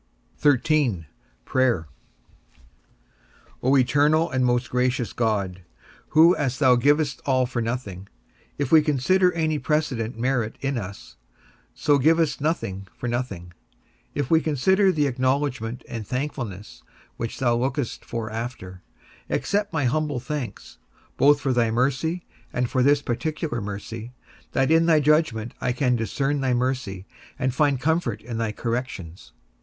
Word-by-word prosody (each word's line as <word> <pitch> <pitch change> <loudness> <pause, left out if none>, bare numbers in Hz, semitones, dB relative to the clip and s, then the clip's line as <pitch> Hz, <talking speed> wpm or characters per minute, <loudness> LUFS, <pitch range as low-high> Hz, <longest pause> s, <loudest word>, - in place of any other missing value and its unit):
XIII. 140 - +2 0.4
PRAYER. 120 -11 +1 1.7
O 135 +2 +4
eternal 145 +6 +3
and 130 0 +1
most 120 0 +1
gracious 125 -1 0
God, 100 -5 -1 0.5
who 165 +3 +6
as 135 -4 -1
thou 130 -2 +5
givest 145 +2 +2
all 130 -2 +2
for 120 -1 -3
nothing, 110 -5 -4 0.5
if 140 -3 -2
we 160 - +8
consider 170 +6 +2
any 155 -2 0
precedent 130 -8 -1
merit 120 -2 -1
in 140 0 -2
us, 95 - -9 0.6
so 145 -1 +2
givest 160 0 +2
nothing 100 - -2
for 125 - -4
nothing, 100 -8 -4 0.6
if 145 -1 -2
we 160 0 +5
consider 190 +7 +3
the 150 -4 +1
acknowledgment 130 -2 -1
and 110 -3 -6
thankfulness 120 -7 -5 0.4
which 115 - -4
thou 120 -2 +2
lookest 130 +1 -2
for 110 -2 -5
after, 110 -6 -6 0.5
accept 205 0 0
my 150 -5 0
humble 145 +1 0
thanks, 130 0 -6 0.4
both 145 +1 +5
for 135 -2 0
thy 120 -2 +2
mercy, 140 +9 0 0.3
and 125 -1 -1
for 130 - +2
this 145 +2 +3
particular 150 0 -2
mercy, 110 +4 -6 0.4
that 135 +2 +2
in 165 +1 +4
thy 160 -2 +5
judgment 145 -7 +1
I 125 - 0
can 125 -1 +1
discern 135 +6 -1
thy 130 -2 +1
mercy, 120 -7 -2 0.3
and 130 -1 -1
find 140 -1 +2
comfort 155 -6 0
in 115 -1 -5
thy 115 -2 -1
corrections. 115 -7 -5
130 Hz, 140 wpm, -24 LUFS, 115-150 Hz, 1.7 s, we